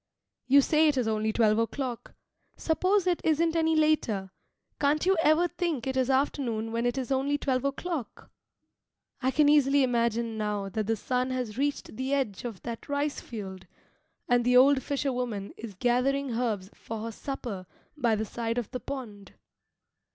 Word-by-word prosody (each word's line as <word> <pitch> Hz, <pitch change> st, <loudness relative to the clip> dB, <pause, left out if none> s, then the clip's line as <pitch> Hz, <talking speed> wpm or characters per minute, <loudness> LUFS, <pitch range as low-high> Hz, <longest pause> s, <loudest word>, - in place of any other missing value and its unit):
You 280 Hz, +2 st, +7 dB
say 310 Hz, +3 st, +3 dB
it 295 Hz, -3 st, +2 dB
is 245 Hz, -3 st, +1 dB
only 220 Hz, 0 st, 0 dB
twelve 215 Hz, -1 st, +3 dB
o'clock. 245 Hz, +1 st, -3 dB, 0.4 s
Suppose 370 Hz, +4 st, +1 dB
it 355 Hz, -2 st, +1 dB
isn't 325 Hz, +1 st, +2 dB
any 320 Hz, -1 st, +2 dB
later; 250 Hz, -12 st, +1 dB, 0.5 s
can't 295 Hz, +3 st, +2 dB
you 380 Hz, +1 st, +4 dB
ever 325 Hz, +3 st, +4 dB
think 340 Hz, -7 st, -2 dB
it 265 Hz, 0 st, -2 dB
is 260 Hz, 0 st, +1 dB
afternoon 260 Hz, -5 st, 0 dB
when 230 Hz, +1 st, 0 dB
it 245 Hz, -, -1 dB
is 260 Hz, 0 st, -3 dB
only 275 Hz, +2 st, +1 dB
twelve 260 Hz, -3 st, 0 dB
o'clock? 280 Hz, -, -4 dB, 0.9 s
I 260 Hz, -, +2 dB
can 295 Hz, +2 st, +3 dB
easily 285 Hz, -1 st, +5 dB
imagine 235 Hz, -2 st, 0 dB
now 210 Hz, -2 st, -2 dB
that 215 Hz, 0 st, -3 dB
the 225 Hz, -, +2 dB
sun 250 Hz, +3 st, -1 dB
has 250 Hz, -5 st, -3 dB
reached 280 Hz, -4 st, -2 dB
the 265 Hz, +2 st, 0 dB
edge 250 Hz, -6 st, -2 dB
of 225 Hz, -6 st, -6 dB
that 235 Hz, +2 st, -6 dB
rice 285 Hz, +1 st, -1 dB
field, 190 Hz, -5 st, -8 dB, 0.6 s
and 245 Hz, 0 st, +3 dB
the 250 Hz, +1 st, +4 dB
old 270 Hz, +1 st, +6 dB
fisher 280 Hz, -1 st, -1 dB
woman 230 Hz, -6 st, -3 dB
is 220 Hz, -4 st, -9 dB
gathering 255 Hz, +5 st, +1 dB
herbs 220 Hz, -5 st, -2 dB
for 225 Hz, -1 st, -7 dB
her 230 Hz, -, -4 dB
supper 220 Hz, -7 st, -6 dB, 0.3 s
by 240 Hz, -7 st, +2 dB
the 215 Hz, +1 st, -2 dB
side 230 Hz, +1 st, -3 dB
of 240 Hz, -4 st, -3 dB
the 250 Hz, -, -4 dB
pond. 230 Hz, -8 st, -7 dB
250 Hz, 175 wpm, -28 LUFS, 225-285 Hz, 0.9 s, You